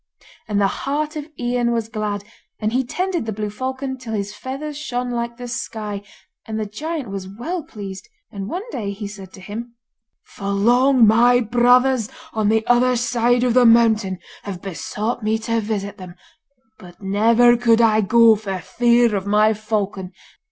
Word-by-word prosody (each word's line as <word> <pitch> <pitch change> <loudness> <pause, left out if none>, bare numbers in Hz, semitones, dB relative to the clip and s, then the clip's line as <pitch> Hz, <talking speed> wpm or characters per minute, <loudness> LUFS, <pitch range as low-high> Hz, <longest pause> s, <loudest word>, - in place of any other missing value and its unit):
And 205 -2 0
the 200 - +3
heart 295 - -2
of 300 -1 -5
Ian 240 -1 0
was 230 -2 -1
glad, 210 -3 -3 0.4
and 215 +1 -1
he 260 +1 +2
tended 355 0 -2
the - - -1
blue 210 0 -4
falcon 260 +3 -4
till 230 -3 -6
his 205 -1 -3
fathers 280 +5 -6
shone 250 -4 -3
like 235 0 -3
the 245 0 -7
sky, 215 -4 -4 0.5
and 220 0 -3
the 215 - -2
giant 290 +4 -5
was 195 -1 -5
well 245 - -4
pleased; 200 - -9 0.2
and 200 0 -6
one 375 - -4
day 200 -4 -3
he 205 +1 -7
said 195 -2 -10
to - - -12
him: 230 +5 -7 0.5
'For 200 - -9
long 240 +5 +4
my 240 +3 +5
brothers 245 0 +3 0.2
on 215 -2 +1
the 220 0 +2
other 250 +1 +3
side 245 0 +1
of 245 -2 +2
the 250 -1 +6
mountain 220 -5 +4 0.2
have 195 -3 -6
besought 210 +6 -4
me 215 +1 +1
to 230 +1 -1
visit 205 -2 -4
them, 180 -1 -10 0.6
but 180 -4 -14
never 230 +5 +4
could 230 -1 +3
I 220 -2 +4
go 230 +2 +6
for 200 -3 -4
fear 235 +2 +2
of 195 0 -3
my 210 +1 +4
falcon. 205 -3 -3
225 Hz, 175 wpm, -21 LUFS, 205-245 Hz, 0.6 s, the